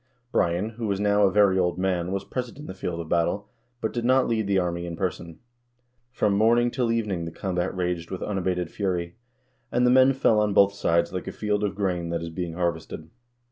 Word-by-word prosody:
Brian, 90 +5 +1
who 115 0 -5
was 100 -1 -1
now 105 0 +2
a - - 0
very 100 -1 +4
old 90 -1 +1
man, 90 -1 -1
was 100 0 -2
present 125 +3 -5
on 150 - -9
the - - -6
field 90 -2 -4
of 85 - -5
battle, 85 +5 0 0.3
but 110 - -2
did 120 - -2
not 130 +1 +3
lead 110 -3 0
the 100 -1 +2
army 85 -1 -1
in 85 - -5
person. 85 -2 -4 0.7
From 105 -4 +1
morning 120 +4 +3
till 120 -3 0
evening 105 -7 -1
the 85 - -5
combat 90 0 -2
raged 90 -2 -2
with 95 - -5
unabated 90 -4 -2
fury, 90 -3 -2 0.5
and 125 +1 +2
the 125 - +5
men 130 +1 +6
fell 120 -5 +3
on 105 -2 +1
both 100 0 +5
sides 85 -3 +1
like 90 - -4
a - - -3
field 105 -1 -1
of 100 -1 -1
grain 90 -4 -1
that 85 0 -2
is 85 - -5
being 85 0 -4
harvested. 80 -2 -3
95 Hz, 220 wpm, -25 LUFS, 85-105 Hz, 0.7 s, men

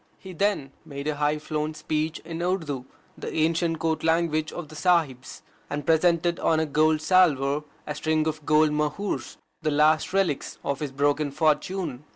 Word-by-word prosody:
He 190 -1 -10
then 185 -7 0
made 140 -2 -7
a 150 -1 -1
high 150 +1 +1
flown 150 0 -3
speech 155 +1 -2
in 165 0 -5
Urdu, 160 -8 -2 0.3
the - - -6
ancient 165 +1 +1
Court 160 0 -1
language 160 -1 +1
of 165 -4 -7
the 155 - -11
Sahibs, 155 -7 0 0.3
and 145 -1 -4
presented 170 +1 +2
on 160 - +2
the 160 - +1
golden 155 +1 +3
salver 150 -4 +3 0.2
a 150 - -3
string 155 +1 0
of 155 -1 -3
gold 155 0 +4
mohurs, 150 +7 -2 0.2
the 155 - 0
last 155 +4 +3
relics 185 -7 0
of 140 -1 -2
his 150 -3 -4
broken 145 +2 +1
fortune. 155 0 -1
155 Hz, 170 wpm, -26 LUFS, 150-165 Hz, 0.3 s, gold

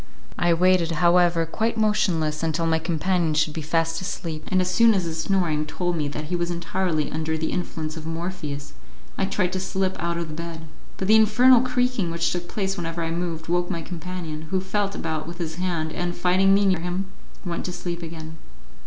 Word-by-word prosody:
I 175 - +3
waited, 180 -1 +4
however, 170 0 +4
quite 225 +8 -1
motionless, 170 -8 +1
until 165 0 0
my 160 0 +2
companion 165 0 0
should 155 0 +2
be 160 - -4
fast 165 +2 0
asleep, 160 -4 -4
and 185 - +2
as 185 - +1
soon 225 +4 +5
as 190 - +1
his 165 -1 -4
snoring 170 -5 +1
told 175 +1 -1
me 150 -3 -1
that 145 +1 -5
he 175 +4 -2
was 175 0 -1
entirely 170 -2 -1
under 160 +1 -1
the 160 0 -2
influence 160 -3 -3
of 160 -1 -7
Morpheus, 165 -4 -4 0.4
I - - 0
tried 185 -2 0
to 190 - -1
slip 190 0 -1
out 170 0 -1
of 170 -1 -3
the - - -6
bed; 165 0 -6 0.3
but 190 - -2
the 215 - +7
infernal 230 +3 +6
creaking 250 -6 0
which 170 0 0
took 175 -1 -3
place 195 -1 -2
whenever 165 -1 -3
I 165 - -2
moved, 165 -1 -3
woke 175 +1 +1
my 170 -3 -3
companion, 165 -2 -6
who 190 - +1
felt 200 +1 -1
about 160 -1 -3
with 170 0 -7
his 160 -2 -4
hand, 170 -4 -1
and, 175 0 -2
finding 185 +2 +3
me 200 0 +3
near 185 -3 +3
him, 180 +3 -3 0.3
went 175 -1 -3
to 180 - -3
sleep 175 -1 -5
again. 160 -1 -8
170 Hz, 205 wpm, -24 LUFS, 160-185 Hz, 0.4 s, the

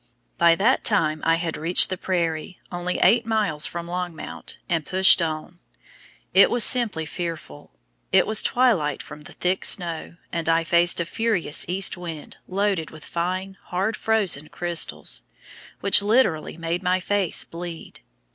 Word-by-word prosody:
By 170 -1 +5
that 225 +9 +1
time 155 -7 +2
I 165 - +3
had 165 -1 -4
reached 170 +4 +2
the - - -1
prairie, 170 -2 -3
only 175 0 -3
eight 230 +5 +4
miles 210 -9 0
from 170 -1 -6
Longmount, 175 -2 -7
and 165 -3 -1
pushed 185 +2 +5
on. 160 +2 -5 0.7
It - - +6
was 240 -2 +3
simply 220 -10 +3
fearful. 155 - -8 0.4
It 190 - +4
was 215 0 +5
twilight 215 - 0
from 150 0 -12
the 150 - -12
thick 180 +1 -2
snow, 170 -3 +3 0.2
and 165 -1 -2
I 165 0 +2
faced 170 +1 +3
a 170 - -1
furious 205 -6 0
east 190 +1 +2
wind 165 -4 -9
loaded 195 -4 -1
with 155 -1 -12
fine, 185 +3 -4
hard 195 +5 -2
frozen 200 -11 0
crystals, 175 -1 -1 0.6
which 200 0 +5
literally 205 -8 0
made 165 +2 -3
my 185 0 0
face 195 -1 0
bleed. 170 -1 -9
175 Hz, 150 wpm, -23 LUFS, 165-195 Hz, 0.7 s, It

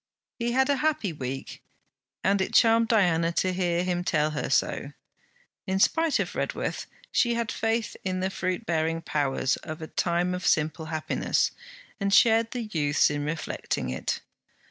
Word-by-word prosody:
He 235 0 -1
had 265 +1 +3
a 285 -1 +2
happy 280 - 0
week, 135 -2 -6 0.6
and 195 0 +2
it - - -2
charmed 230 0 +5
Diana 175 -7 +3
to 185 +2 +1
hear 175 -1 0
him 180 -1 -1
tell 155 -4 +1
her 150 - -3
so. - - 0 0.7
In 190 0 0
spite 320 +10 +3
of - - -2
Redworth, - - -3 0.2
she 240 -1 +2
had 230 -1 -1
faith 225 0 -1
in 185 -1 -2
the 190 +1 -1
fruit 185 +4 -2
bearing 165 -2 0
powers 135 -2 0
of 155 +1 -7
a 160 - -5
time 175 +2 0
of 180 0 -3
simple 155 +1 +1
happiness, 160 -1 0 0.5
and 200 -1 0
shared 225 +2 +5
the 245 -1 -4
youth's 150 -9 +2
in 145 0 -2
reflecting 150 - -3
it. 65 - -3
180 Hz, 165 wpm, -27 LUFS, 160-225 Hz, 0.7 s, charmed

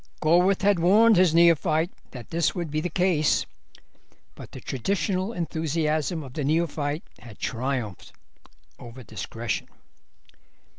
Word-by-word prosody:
Gorworth 180 +5 +3
had 200 -3 +3
warned 210 +6 +5
his 175 -3 +4
neophyte 165 0 +3 0.2
that 125 -3 -11
this 170 -1 0
would 170 -4 -4
be 155 +1 -1
the 175 - -2
case, 170 -3 +1 0.9
but - - -12
the - - -9
traditional 185 - -2
enthusiasm 160 - -1
of 130 -2 -11
the 150 - -3
neophyte 155 0 -1 0.2
had 115 -4 -13
triumphed 125 -5 -4 0.7
over 125 +1 -11
discretion. 115 +1 -5
160 Hz, 120 wpm, -25 LUFS, 140-180 Hz, 0.9 s, warned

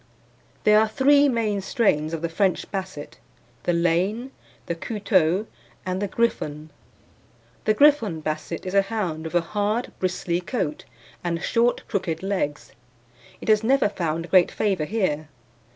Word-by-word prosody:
There 210 0 +6
are 220 - +3
three 285 +5 +4
main 220 -5 0
strains 190 - +1
of 165 -1 -4
the - - +1
French 180 +2 0
Basset 190 -7 -6 0.5
the - - +2
Lane, 180 +9 0 0.3
the - - -2
Couteulx, 190 -1 +1 0.4
and 185 +1 -2
the 205 - 0
Griffon. 155 -8 -2 0.9
The 215 - +3
Griffon 255 - +4
Basset 155 +2 -4
is 185 - -4
a 200 - +5
hound 195 -6 -3
with 160 - -5
a 175 - +4
hard 210 +6 -1
bristly 180 -1 -1
coat, 175 - -3 0.4
and 170 -1 -1
short, 240 +1 +1
crooked 180 -5 -2
legs. 185 -7 -2 0.7
It - - -8
has 215 0 +4
never 260 -2 +3
found 165 -3 -3
great 185 -2 +6
favour 195 -7 0
here. 155 -7 -1
190 Hz, 145 wpm, -24 LUFS, 165-215 Hz, 0.9 s, There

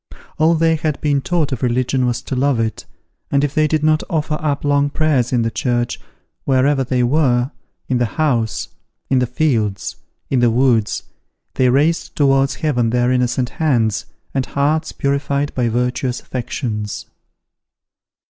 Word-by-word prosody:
All 160 +2 +4
they 165 0 +2
had 155 -2 -2
been 145 -2 +1
taught 160 -1 0
of 130 - -3
religion 125 +1 +1
was 120 -1 -2
to 135 - -4
love 135 -1 +1
it, 110 -1 -2 0.4
and 140 0 +2
if 145 -1 -1
they 155 0 +3
did 155 0 0
not 155 0 +3
offer 155 -3 -1
up 145 -2 -1
long 145 0 +2
prayers 145 -6 +1
in 120 -3 +2
the 115 - -1
church, 120 -1 -1 0.4
wherever 135 +1 +2
they 125 -1 0
were, 125 -1 +2 0.4
in 125 -2 0
the 120 - +2
house, 125 -8 0 0.4
in 130 - +4
the 125 - +1
fields, 115 -8 -1 0.3
in 130 - +1
the 120 -1 +4
woods, 115 -3 +2 0.5
they 130 -1 +3
raised 150 +6 +1
towards 135 -1 +3
heaven 130 -8 0
their 120 +1 +2
innocent 125 0 +1
hands, 115 -9 +1 0.3
and 135 -1 -1
hearts 155 +3 0
purified 140 +1 -1
by 120 -2 0
virtuous 125 +1 -1
affections. 115 -4 -4
130 Hz, 155 wpm, -19 LUFS, 120-145 Hz, 0.5 s, All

